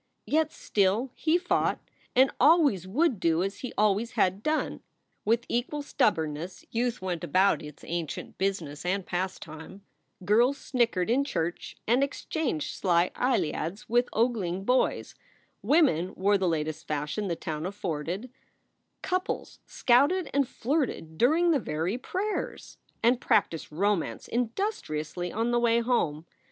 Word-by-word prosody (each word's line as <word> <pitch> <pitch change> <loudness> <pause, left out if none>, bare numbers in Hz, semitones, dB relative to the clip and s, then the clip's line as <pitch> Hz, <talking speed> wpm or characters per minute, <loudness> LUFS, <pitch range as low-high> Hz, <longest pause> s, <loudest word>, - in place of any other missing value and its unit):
Yet 310 +1 +1
still 210 +6 +1
he 315 +2 +2
fought, 355 0 +1 0.4
and 260 +2 +5
always 285 - +4
would 255 - +1
do 165 0 +2
as 195 +1 -4
he 255 - -5
always 215 +3 +2
had 195 -4 +1
done. 310 +6 -1 0.4
With 230 +2 +2
equal 260 +5 -2
stubbornness 165 - -1
youth 235 -3 -1
went 175 -3 -3
about 190 +5 +3
its 150 -1 -11
ancient 165 -3 -5
business 180 -7 -2
and 185 +1 -1
pastime: 180 0 -5 0.4
girls 240 +8 +4
snickered 230 -6 0
in 270 +4 +3
church 170 - -3
and 245 +5 +4
exchanged 280 - -2
sly 175 -1 +2
eyeliads 195 -6 -1
with 240 +2 +2
ogling 205 -6 0
boys; 250 +5 +1 0.5
women 195 - +3
wore 200 +2 +2
the 190 - +1
latest 155 -1 -3
fashion 150 +7 -2
the 170 - -1
town 155 +1 -4
afforded; 185 - -4 0.7
couples 370 +1 -2
scouted 285 +9 +3
and 280 -2 +2
flirted 255 - -2
during 330 +8 +4
the 295 - +3
very 170 +4 -2
prayers, 395 +10 -4 0.2
and 240 +2 +4
practiced 165 -2 +1
romance 170 - -1
industriously 215 - -2
on 230 +3 0
the 240 - +3
way 235 -1 +3
home. 170 -11 0
205 Hz, 135 wpm, -28 LUFS, 170-255 Hz, 0.7 s, and